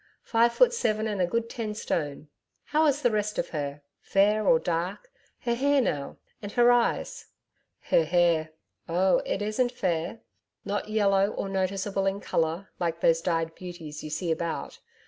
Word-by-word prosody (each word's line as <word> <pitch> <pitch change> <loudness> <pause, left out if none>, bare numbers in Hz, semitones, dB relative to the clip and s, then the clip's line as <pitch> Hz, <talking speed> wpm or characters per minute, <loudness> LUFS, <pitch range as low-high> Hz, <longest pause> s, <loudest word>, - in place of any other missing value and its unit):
Five 235 +1 +3
foot 485 - +4
seven 220 - 0
and 205 -3 -1
a 180 - +2
good 230 +5 -1
ten 220 -2 -4
stone. 150 -7 -3 0.4
How 310 +1 +2
is 290 0 +1
the 245 - +4
rest 210 0 -1
of - - -1
HER? 145 -2 -4 0.2
Fair 210 +1 +2
or 165 - +6
dark 175 - -3 0.3
her 235 - 0
hair 280 +4 +2
now 145 - -2 0.2
and 205 -1 -6
her 240 0 +5
eyes?' 455 - 0 0.5
'Her 165 - +2
hair 170 -2 +2 0.4
oh, 185 +3 +3
it 205 - -1
isn't 230 +4 0
fair 175 -2 -2 0.4
not 205 +1 -3
yellow 200 -2 +3
or 200 - -4
noticeable 195 +1 -1
in 195 +1 0
colour 165 +1 -1
like 170 -1 -1
those 165 0 +4
dyed 165 -2 -1
beauties 165 -5 -8
you 155 - -6
see 165 +3 -2
about. 165 +1 -3
195 Hz, 165 wpm, -27 LUFS, 165-225 Hz, 0.5 s, or